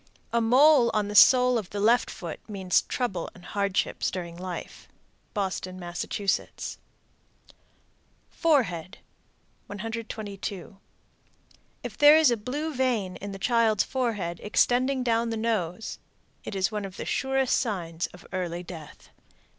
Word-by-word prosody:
A 235 - +3
mole 255 +2 +6
on 210 -1 +1
the 210 - -5
sole 250 +2 +7
of 195 -4 -8
the 205 - -5
left 230 +4 +3
foot 170 -4 -7
means 190 -3 +2
trouble 195 -9 -3
and 180 - -15
hardships 200 -1 -1
during 170 -2 -6
life. 180 0 -7 0.5
Boston, 185 -2 -3
Mass. 175 -1 -4 2.3
FOREHEAD. 205 - +1 0.7
122. 205 -3 -6 1.1
If - - -7
there 295 +1 +9
is 315 -5 +5
a - - +3
blue 290 +8 -4
vein 240 -8 0
in 200 +1 -7
the 195 - -6
child's 220 -1 +2
forehead 210 -10 -2
extending 255 +5 +2
down 230 -2 +2
upon - - -3
the 225 - -2
nose, 220 -4 -2 0.4
it - - -6
is 190 +3 +1
one 210 -1 -3
of 195 -1 -8
the - - -5
surest 265 -1 +1
signs 175 -8 -2
of 180 - -16
early 175 -1 -3
death. 165 -4 -11
210 Hz, 135 wpm, -27 LUFS, 185-245 Hz, 2.3 s, there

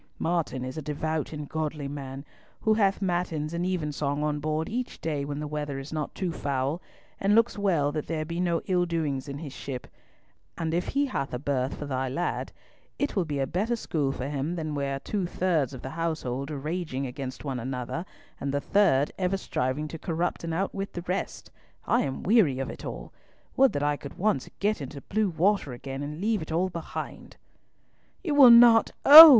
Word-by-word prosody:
Martin 160 -7 -1
is 130 +4 -5
a - - -5
devout 155 +1 -2
and 150 -2 -5
godly 155 -2 -3
man, 140 0 -6 0.4
who 220 - +4
hath 200 -2 +2
matins 175 -4 -1
and 175 +1 -1
evensong 150 -5 -1
on 150 -1 0
board 155 +2 -1
each 245 +2 -3
day 150 -3 -2
when 145 0 -4
the 150 - -3
weather 150 -2 -3
is 135 +3 -7
not 155 -2 -3
too 185 -3 -1
foul, 140 +1 -1 0.4
and 200 +2 +3
looks 230 +1 +4
well 175 -9 +2
that 150 0 -3
there 155 -2 -2
be 170 +2 -4
no 170 -2 +2
ill 180 -2 +2
doings 150 -5 -1
in 140 - -5
his 145 -3 -7
ship; 130 -3 -6 0.7
and 165 -1 -1
if 175 +1 0
he 285 +1 +1
have 140 - -2
a - - -1
berth 135 -1 -1
for 145 - -5
thy 130 -2 -1
lad, 170 +7 -2 0.5
it 285 - -1
will 190 -4 +2
be 145 -2 -3
a 135 - +1
better 200 - 0
school 155 -11 -1
for 130 -1 -4
him 145 +4 -2
than 155 -3 -3
where 140 -1 -1
two 195 -4 -2
thirds 170 -8 +1
of 130 - -9
the 130 - -5
household 155 -5 -2
are 150 - -4
raging 150 -2 -3
against 130 +2 -6
one 135 -3 -2
another, 125 +6 -3 0.4
and 140 - -2
the 140 - +1
third 150 -4 +3
ever 190 +1 +1
striving 135 -3 -1
to 165 +1 -7
corrupt 170 +2 -2
and 165 - -3
outwit 195 +3 -2
the 175 - -5
rest. 180 +2 -3 0.3
I - - +3
am 135 -1 -3
weary 190 - +4
of 135 - -3
it - - -10
all! - - -7 0.4
Would 270 -1 +6
that 145 - -1
I 145 0 +2
could 140 - -9
once 180 -9 +1
get 205 -3 +1
into 140 +1 -6
blue 215 +4 0
water 175 -3 +1
again, 135 +2 -6
and 150 +2 -5
leave 215 0 +1
it 155 - -6
all 175 +4 +1
behind!" 170 -2 -6 0.9
"You 320 -6 0
will 280 -4 +9
not! 235 -1 +8 0.2
Oh! 315 +3 +14
155 Hz, 205 wpm, -27 LUFS, 140-180 Hz, 0.9 s, Oh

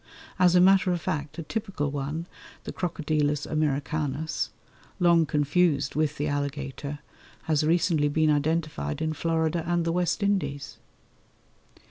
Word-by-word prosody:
As 180 -1 +5
a - - +7
matter 185 0 +5
of 175 - 0
fact, 150 -1 -4
a 165 - -4
typical 190 -6 -3
one, 145 +4 -3 0.4
the - - -6
Crocodilus 150 -4 -1
americanus, 150 0 -1 0.5
long 170 -2 +4
confused 150 0 +1
with 150 -1 0
the 145 - -1
alligator, 145 0 -3 0.5
has 155 -2 +1
recently 160 -1 +2
been 155 +1 +2
identified 150 - -1
in 155 0 -1
Florida 165 +1 0
and 175 -1 +1
the 165 - +1
West 180 +4 0
Indies. 190 -9 -1
155 Hz, 130 wpm, -27 LUFS, 145-170 Hz, 0.5 s, a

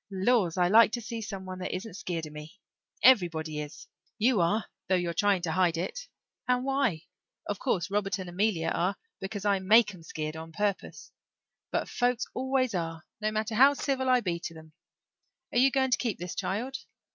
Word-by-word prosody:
"Laws 195 -2 +1
I 180 -1 +4
like 220 +3 +6
to 240 - -2
see 225 +1 -5
some 195 -3 -6
one 185 0 -7
that 185 - -3
isn't 190 +2 -6
skeered 175 -4 -4
of 150 - -10
me. 150 +5 -10 0.5
Everybody 165 -10 +4
is 150 +1 -9 0.3
you 225 -3 +3
are, 210 +6 +1 0.2
though 190 - +3
you're 175 -2 -1
trying 195 0 +2
to 165 - -1
hide 170 -1 +2
it. - - -4 0.4
And 250 0 +2
why? 270 - 0 0.4
Of 205 - -3
course 190 -9 -1
Robert 200 -2 0
and 185 -2 -6
Amelia 175 -2 0
are 180 +4 0 0.2
because 200 +1 -5
I 200 -1 +3
make 210 +3 +5
'em 180 - -13
skeered 155 -1 -5
on 160 0 -8
purpose. 200 +1 -3 0.6
But - - -1
folks 245 0 0
always 260 -2 0
are 165 -2 -3 0.2
no 215 0 0
matter 215 +1 -2
how 270 +6 +6
civil 265 -2 -1
I 250 -1 +4
be 175 -5 -2
to 165 -1 -7
them. 160 -1 -14 0.8
Are 240 - +2
you 265 +2 +6
going 265 -1 +1
to - - +4
keep 230 -5 -1
this 175 +1 -5
child?" 250 +7 -3
195 Hz, 195 wpm, -29 LUFS, 170-235 Hz, 0.8 s, like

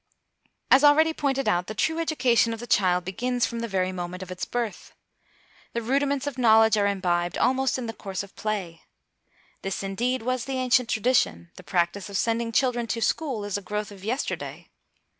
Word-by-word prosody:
As 270 +2 +7
already 315 +2 +6
pointed 275 -4 -1
out, 180 -3 +1
the 215 - -6
true 320 +9 0
education 245 -8 +2
of - - -12
the 240 - -6
child 180 -5 +2
begins 245 +6 -1
from 235 - -4
the 230 - -3
very 185 -3 0
moment 180 0 -5
of 185 - -10
its 180 - -4
birth. 235 -6 -4 0.8
The 235 - -1
rudiments 275 +3 0
of 280 -3 -4
knowledge 225 -2 +6
are 205 -1 +2
imbibed 175 -3 0
almost 265 0 +2
in 255 - -4
the 225 - -4
course 195 -2 -5
of 200 - -14
play. 195 -6 -4 0.8
This, 195 0 -3
indeed, 235 +6 -1
was 255 0 -1
the 270 -1 -3
ancient 250 -2 +2
tradition; 90 - +1
the - - -11
practice 180 +3 -1
of 200 - -2
sending 230 +2 0
children 240 -1 +1
to 230 +1 -2
school 245 -3 -1
is 205 0 -2
a - - -13
growth 210 +1 -4
of 195 -2 -12
yesterday. 245 +6 -4
225 Hz, 190 wpm, -26 LUFS, 195-255 Hz, 0.8 s, As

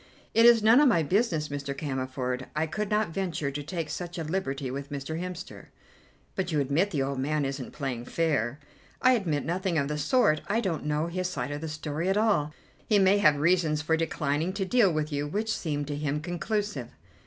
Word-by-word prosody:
"It 230 +1 +7
is 235 -2 +6
none 225 +4 +7
of 295 - +6
my 170 -10 +4
business, 170 -3 +1
Mr. 140 -1 -4
Cammerford. 130 -2 -3
I 155 +1 +1
could 210 +6 -3
not 210 -2 +1
venture 160 -6 -2
to 145 +1 -4
take 165 +2 -4
such 175 +2 -5
a 165 - -2
liberty 145 -6 -2
with 140 +1 -5
Mr. 145 +3 -4
Hemster." 180 +1 -7 0.7
"But 185 -2 -2
you 150 - +1
admit 145 +8 +1
the 145 -8 0
old 135 0 -2
man 150 +2 0
isn't 135 -1 -4
playing 130 -5 -4
fair?" 145 -5 0 0.4
"I 255 - +5
admit 170 - 0
nothing 180 +1 -1
of 140 -1 0
the 150 0 -2
sort: 155 - +3
I 225 - +1
don't 175 -10 -2
know 150 +1 +1
his 185 +2 -2
side 130 -6 -3
of 145 0 -4
the 160 - -4
story 155 +3 -3
at 195 - +2
all. 200 -9 +2 0.4
He 215 - +4
may 195 +1 +5
have 155 -7 +5
reasons 155 0 +2
for 160 +1 +2
declining 160 +1 -1
to 195 0 -2
deal 210 -2 +4
with 155 -1 -2
you, 145 +1 -1
which 215 +8 -1
seem 145 -3 -2
to 145 0 -4
him 145 0 -1
conclusive." 175 - -3
155 Hz, 210 wpm, -28 LUFS, 145-190 Hz, 0.7 s, It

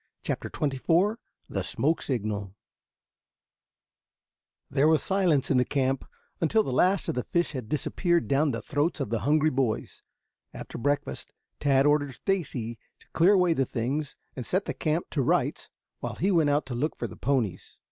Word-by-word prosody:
CHAPTER - - -3
XXIV 165 - +1 0.3
THE - - -2
SIGNAL 160 - +1
SMOKE 105 -6 -2 2.2
There 140 +2 +3
was 160 -1 +3
silence 180 -9 +2
in 135 - +4
the 125 - +5
camp 135 -1 0 0.3
until 215 +7 +3
the 130 - -3
last 185 +7 +3
of - - 0
the 125 - -2
fish 175 0 0
had 125 -7 -6
disappeared 170 +4 +1
down 145 +2 +2
the - - -3
throats 150 +3 0
of 130 -6 -3
the 115 - +1
hungry 155 +1 +3
boys. 130 -4 -1 0.5
After - - -7
breakfast 145 - -2 0.3
Tad 135 -1 +3
ordered 145 -2 +2
Stacy 130 - -2 0.2
to - - -23
clear 175 +5 +4
away 180 -3 +4
the 135 - +1
things 135 +6 -2 0.2
and 125 - -4
set 185 +10 0
the - - -2
camp 160 +1 -1
to 145 - 0
rights 125 - 0 0.3
while - - -4
he 195 +3 +1
went 160 -5 +3
out 145 +1 +2
to 130 - -5
look 145 +7 -1
for - - -4
the - - -7
ponies. 120 -10 -1
145 Hz, 170 wpm, -27 LUFS, 130-165 Hz, 2.2 s, the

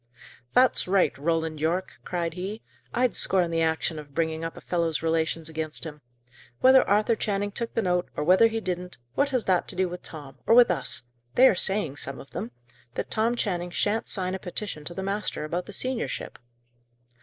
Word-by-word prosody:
"That's 255 -5 +4
right, 185 -7 +3
Roland 160 +1 -1
Yorke!" 170 +4 -1
cried 170 -2 -2
he. 195 +5 -5 0.3
"I'd 250 0 +2
scorn 180 -3 +2
the 165 0 +1
action 160 0 0
of 145 -2 -12
bringing 160 -1 0
up 165 - -5
a - - -9
fellow's 165 -3 -1
relations 160 0 0
against 160 -1 -3
him. 150 -2 -7 0.6
Whether 260 0 +7
Arthur 210 +3 +3
Channing 205 -1 -1
took 230 +3 -3
the 225 - +1
note, 180 -1 +1
or - - 0
whether 185 +8 +6
he 225 0 -2
didn't, 180 -2 -4 0.2
what 280 0 +2
has 255 -4 0
that 185 -2 +2
to - - -6
do 185 0 +1
with 180 0 -7
Tom? 140 -4 -11
or 230 - +6
with 245 -5 +7
us? 175 - -2 0.3
They 260 - +8
are - - +5
saying, 185 -5 0
some 140 -1 -6
of 140 - -12
them, 115 - -4 0.5
that - - -4
Tom 230 +2 +2
Channing 180 -6 -1
shan't 210 +5 0
sign 185 -2 0
a 190 - -3
petition 180 -4 -4
to 175 - -6
the 190 - -3
master 200 -3 -2
about 175 +3 -3
the - - -7
seniorship!" 255 +3 -3
180 Hz, 200 wpm, -26 LUFS, 160-210 Hz, 0.6 s, They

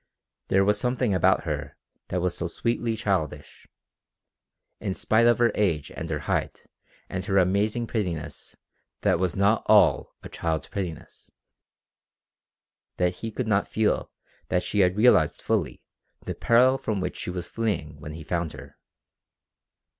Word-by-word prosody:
There 95 +1 +3
was 105 +1 +2
something 125 -2 0
about 95 +1 +3
her 75 -4 -4 0.3
that 90 - -2
was 90 -1 -1
so 85 - -2
sweetly 115 +5 -1
childish 95 -9 -3 1.1
in 95 -3 -3
spite 115 +2 +3
of 120 - +5
her 120 -1 +3
age 85 -9 0
and 80 - -6
her 75 -1 -2
height - - -2 0.4
and 90 0 -4
her 100 -1 +1
amazing 100 +5 +2
prettiness 90 -10 -4 0.5
that - - +2
was 90 -2 0
not 100 +3 +3
all 90 -11 +4
a - - -6
child's 80 -3 -2
prettiness 90 -6 -7 1.7
that 90 0 0
he 115 - -5
could 115 +2 -4
not 100 -2 +2
feel 110 -1 0 0.4
that 90 - 0
she 105 - -2
had 90 0 +3
realized 120 +3 +4
fully - - -1 0.4
the - - -3
peril 130 +3 +4
from 105 -3 -2
which 90 -1 -3
she - - -5
was 90 -1 -4
fleeing 85 -10 -3
when 75 +1 -8
he 80 0 -8
found 85 0 -2
her. - - -12
95 Hz, 150 wpm, -26 LUFS, 85-110 Hz, 1.7 s, of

